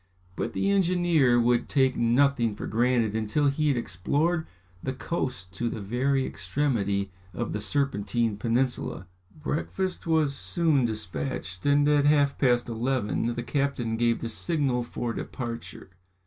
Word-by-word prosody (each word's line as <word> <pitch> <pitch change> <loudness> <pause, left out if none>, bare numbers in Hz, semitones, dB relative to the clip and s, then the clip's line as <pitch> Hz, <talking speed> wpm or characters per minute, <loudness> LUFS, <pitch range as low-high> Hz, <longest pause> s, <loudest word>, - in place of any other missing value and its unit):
But - - -3
the 200 - +1
engineer 175 -9 +3
would 120 0 +2
take 130 -2 +3
nothing 120 -1 +2
for - - -6
granted 115 -1 +1
until 110 +7 +1
he 150 +2 0
had 140 -3 +2
explored 145 - 0 0.3
the 130 - -3
coast 125 - -4
to 120 - 0
the 115 - -5
very 130 +6 0
extremity 100 -9 -1 0.2
of 120 - -3
the 105 - -3
Serpentine 115 -5 0
peninsula. 120 -4 -1 0.3
Breakfast 170 +5 -3
was 155 -4 +2
soon 155 -5 +1
despatched, 110 -1 -4
and 145 0 +4
at 145 -1 +4
half 145 -2 +3
past 120 -3 +3
eleven 120 -1 -1
the 120 - -3
captain 135 -5 -1
gave 115 0 +1
the 115 - -3
signal 135 0 0
for 120 0 -4
departure. 115 -6 -6
125 Hz, 140 wpm, -27 LUFS, 115-145 Hz, 0.3 s, and